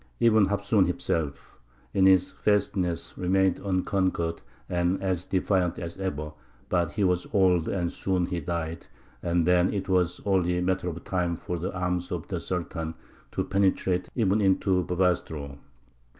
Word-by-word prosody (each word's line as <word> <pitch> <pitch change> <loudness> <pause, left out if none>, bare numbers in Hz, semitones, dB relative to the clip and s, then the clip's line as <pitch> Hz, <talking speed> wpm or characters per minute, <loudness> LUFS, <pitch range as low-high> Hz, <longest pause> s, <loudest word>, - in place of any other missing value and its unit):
Ibn 110 -4 +5
Hafsūn 100 -1 +2
himself, 80 -4 -3 0.3
in 95 -1 +5
his 95 -1 +4
fastness, 95 -4 0
remained 95 +1 +2
unconquered 95 -3 0 0.3
and 90 +1 0 0.3
defiant 90 -2 +1
as 85 -1 -5
ever, 75 -5 -3 0.4
but 85 -3 +1
he 105 - 0
was 90 -1 +1
old, 90 -5 +3
and 85 -3 -1
soon 95 -2 0
he 90 -1 -3
died, 85 0 -4 0.3
and 85 -1 +1
then 90 +1 +4
it 95 -2 -3
was 90 -2 +1
only 90 -3 +2
a - - 0
matter 95 0 0
of 85 0 -7
time 90 -2 -1
for 85 +1 -4
the 90 +4 -3
arms 90 0 -1
of - - -4
the - - -2
Sultan 85 -2 -4 0.4
to - - -1
penetrate 95 -2 +1
even 105 -3 +2
into 95 -1 +2
Bobastro. 80 -6 -1
90 Hz, 150 wpm, -27 LUFS, 85-95 Hz, 0.4 s, Ibn